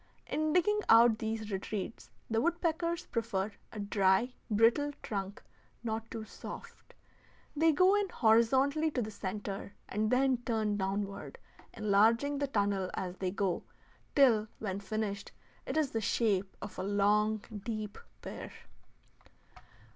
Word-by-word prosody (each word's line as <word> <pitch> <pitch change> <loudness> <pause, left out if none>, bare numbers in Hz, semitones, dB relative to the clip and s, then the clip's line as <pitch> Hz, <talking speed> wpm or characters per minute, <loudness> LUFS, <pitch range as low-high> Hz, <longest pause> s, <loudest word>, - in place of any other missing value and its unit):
In 310 +1 0
digging 360 +5 +3
out 230 -1 +7
these 220 -1 -3
retreats 195 +2 -4 0.2
the 225 0 +1
woodpeckers 340 +1 0
prefer 205 -3 -2 0.2
a 215 - -7
dry, 200 +3 +2 0.2
brittle, 230 +7 +3
trunk, 200 -1 -4 0.4
not 225 -1 -3
too 225 -1 -6
soft. - - -10 0.6
They 320 +2 +4
go 365 +5 +5
in 410 -2 +1
horizontally 265 +6 +3
to 255 -5 -1
the 215 - -5
centre 200 0 -5
and 215 +1 0
then 260 +1 +3
turn 220 -3 -1
downward, 200 - -3 0.4
enlarging 225 +6 +3
the 285 - 0
tunnel 200 -6 0
as 185 -1 -4
they 185 - -1
go, 190 -2 -1 0.5
till 230 -6 +5
when 200 -2 -3
finished 205 0 -3 0.3
it - - -2
is 300 -4 +1
the 225 - -1
shape 200 -3 0
of 205 - -7
a - - -1
long, 205 +2 +2 0.2
deep 215 -2 -4 0.2
pear. - - -7
220 Hz, 130 wpm, -32 LUFS, 200-265 Hz, 0.6 s, out